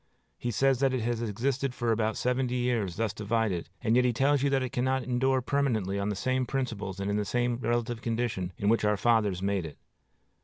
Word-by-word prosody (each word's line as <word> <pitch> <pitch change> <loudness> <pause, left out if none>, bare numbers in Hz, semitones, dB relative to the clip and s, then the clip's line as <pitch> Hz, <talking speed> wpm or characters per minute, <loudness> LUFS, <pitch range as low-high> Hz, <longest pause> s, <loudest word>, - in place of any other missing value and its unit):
He 120 - -2
says 135 +3 +2
that 135 -1 +2
it 125 - -1
has 115 0 -1
existed 125 +4 -1
for 120 -1 0
about 110 0 0
seventy 125 0 0
years 120 -7 0
thus 110 0 -1
divided, 105 -5 -1
and 115 -1 +3
yet 125 - +5
he 125 - +3
tells 135 +4 +2
you 140 - +2
that 135 -1 +1
it 125 - -3
cannot 130 +1 0
endure 130 +1 +1
permanently 115 -9 0
on 100 +1 -1
the 105 - -1
same 130 +5 0
principles 110 -8 -3
and 100 - -2
in 100 - 0
the 105 - 0
same 120 +3 0
relative 120 -1 -1
condition 115 -6 -2
in 100 - -2
which 115 +1 +3
our 105 0 +2
fathers 105 -5 +2
made 100 -2 0
it. 80 -3 -8
120 Hz, 220 wpm, -29 LUFS, 105-130 Hz, -, yet